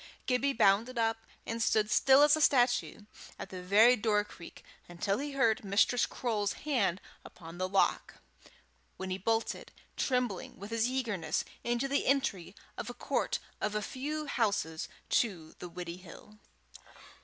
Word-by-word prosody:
Gibbie 265 +2 +1
bounded 225 +3 +3
up 225 -1 -1 0.2
and 230 +1 -3
stood 215 -1 +2
still 270 +1 +6
as 295 0 +6
a 310 - -2
statue 245 -6 +2 0.4
at - - -8
the 185 -1 -6
very 210 +7 +6
door 210 -2 +1
cheek, 175 -4 -13 0.3
until 195 +4 -1
he 285 0 -4
heard 230 -6 +2
Mistress 205 +5 +2
Croale's 210 -5 -1
hand 200 - +1 0.2
upon 170 0 -12
the 185 0 -1
lock, 195 0 +1 0.8
when 190 0 -5
he 185 - -2
bolted, 225 +3 -1 0.2
trembling 250 -7 -1
with 205 +3 -8
eagerness, 230 -6 -1 0.2
into 240 +3 0
the 280 +1 0
entry 210 -10 0 0.2
of - - -5
a - - -7
court - - -1 0.2
a 210 0 0
few 290 +8 -4
houses 200 - -1
nearer - - +1
to 175 -9 -3
the 180 - -7
Widdiehill. 180 +4 -10
220 Hz, 145 wpm, -31 LUFS, 190-250 Hz, 0.8 s, still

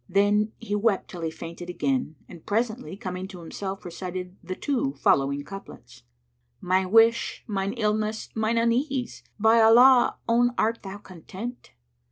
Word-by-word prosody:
Then 205 +3 +2
he 225 -3 -6
wept 205 -1 0
till 175 - -7
he 165 - -1
fainted 170 +2 -8
again, 255 - -1
and 170 - -13
presently 225 -1 -2
coming 185 -3 -5
to 185 -2 -10
himself 190 +3 -6
recited 180 +1 -6
the 185 +2 -5
two 245 - -1
following 140 +1 +2
couplets, 195 - -11 0.6
"My 185 +1 +1
wish, 225 +3 +3
mine 200 -2 -2
illness, 215 -1 -1
mine 220 +1 0
unease! 245 +3 0 0.2
by 220 +2 +4
Allah, 245 +3 +6
own 245 +1 +3
* - - -31
Art 225 +1 +1
thou 195 0 -7
content? 205 +5 -9
205 Hz, 150 wpm, -26 LUFS, 185-230 Hz, 0.6 s, Allah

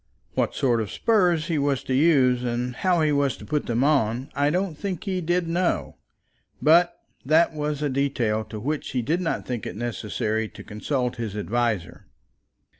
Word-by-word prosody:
What - - 0
sort 120 -5 +2
of 105 - -4
spurs 180 -8 +2
he 165 -3 0
was 140 -1 0
to 130 - -2
use, 130 -4 +4
and 125 +1 -2
how 180 -3 +2
he 155 -1 +3
was 140 -2 +1
to - - -11
put 150 -1 -1
them 120 +2 +1
on, 135 -2 +1
I 145 +1 +2
don't 180 +1 -1
think 185 +2 -4
he 190 -3 -2
did 175 +1 0
know; 175 +2 -1 0.6
but 170 +3 +4 0.3
that 160 +4 +4
was 150 -1 -2
a - - +2
detail 130 -5 0
as 110 - -6
to 110 -1 -7
which 145 +6 -3
he 125 -2 0
did 165 +9 0
not 165 - -2
think 120 -5 -4
it - - -6
necessary 110 -1 -2
to - - -11
consult 125 +4 -2
his 110 -3 -4
adviser. 110 -4 -2
140 Hz, 190 wpm, -25 LUFS, 120-160 Hz, 0.6 s, use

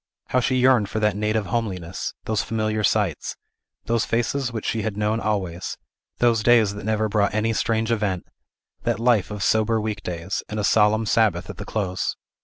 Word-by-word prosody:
How 130 - +3
she 130 +1 +1
yearned 125 -5 +4
for 110 - -2
that 105 -2 +2
native 105 0 0
homeliness, 95 -5 -3
those 110 -1 0
familiar 110 -1 -1
sights, 100 -7 0 0.5
those 115 0 +1
faces 120 +2 0
which 110 -2 -5
she 110 - 0
had 105 -2 -3
known 105 +2 +1
always, 95 -5 -2 0.4
those 120 -2 +3
days 110 -3 +4
that 105 - -8
never 110 0 +1
brought 105 -1 +1
any 110 +1 +1
strange 110 +1 0
event; 100 -5 -1 0.6
that 120 -2 0
life 115 -4 +3
of 105 -2 -4
sober 110 +1 +2
week 105 -1 -3
days, 90 +2 -3
and 105 - -3
a - - -1
solemn 110 +1 +3
sabbath 100 -5 +2
at 95 - -13
the 100 - -6
close! 95 -4 -2
110 Hz, 185 wpm, -23 LUFS, 100-115 Hz, 0.6 s, yearned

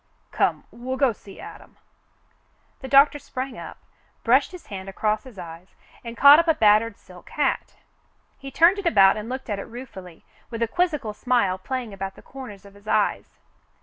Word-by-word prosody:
Come, - - 0
we'll 255 +2 -5
go 270 -3 +3
see 200 -2 -15
Adam." - - -12 1.0
The 265 - -8
doctor 280 +2 +5
sprang 265 -2 -6
up, - - -9 0.5
brushed 260 +8 +3
his 360 -2 -11
hand 195 -2 -8
across 215 +3 -1
his 250 -6 -13
eyes, 170 0 -11 0.3
and 235 -1 -8
caught 285 +2 +9
up 335 - +1
a 320 - +3
battered 215 -1 +3
silk 180 -1 -16
hat. 290 -3 -1 0.6
He 275 - -8
turned 340 +8 +4
it 395 - -2
about 195 - +5
and 215 +2 -6
looked 260 +1 -6
at 205 -3 -3
it - - -6
ruefully, 195 -8 -11 0.2
with 230 -1 -3
a - - 0
quizzical 300 -7 -1
smile 210 -5 0
playing 245 +1 -5
about 195 0 -6
the - - -16
corners 245 -8 -11
of 200 - -15
his 205 +1 -19
eyes. - - -1
230 Hz, 180 wpm, -23 LUFS, 200-270 Hz, 1.0 s, caught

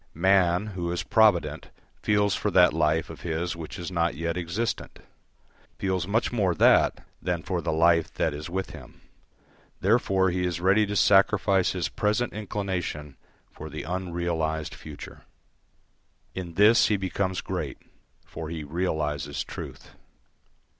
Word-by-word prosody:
Man, 95 +1 +3
who 85 -2 -3
is 90 - -2
provident, 110 -6 +2 0.3
feels 105 -1 +2
for 105 - -1
that 90 -4 +5
life 80 0 +1
of - - -11
his 85 +1 -2
which 80 -2 -7
is 90 +1 -6
not 85 -3 0
yet 85 +2 -2
existent, 90 +7 -3 0.8
feels 95 -2 -1
much 110 +3 +1
more 100 -7 +1
that - - +4 0.2
than - - -2
for - - -2
the - - -1
life 85 +1 +3
that - - 0
is 75 +3 -6
with 95 +2 -3
him; - - -13 0.8
therefore 95 -3 +2
he 90 +1 -1
is 90 -1 -1
ready 100 +4 +3
to 105 - -3
sacrifice 95 -1 +4
his 90 -3 -1
present 105 +3 -1
inclination 95 -8 -4 0.4
for 80 - -9
the 75 +1 -6
unrealised 85 -3 -2
future. 75 -2 -10 1.1
In 85 -3 -6
this 105 +4 +6
he 105 - +2
becomes 95 0 -2
great, - - -4 0.5
for 80 -1 -7
he 80 -2 -5
realises 75 -3 -2
truth. - - -9
90 Hz, 140 wpm, -26 LUFS, 80-100 Hz, 1.1 s, this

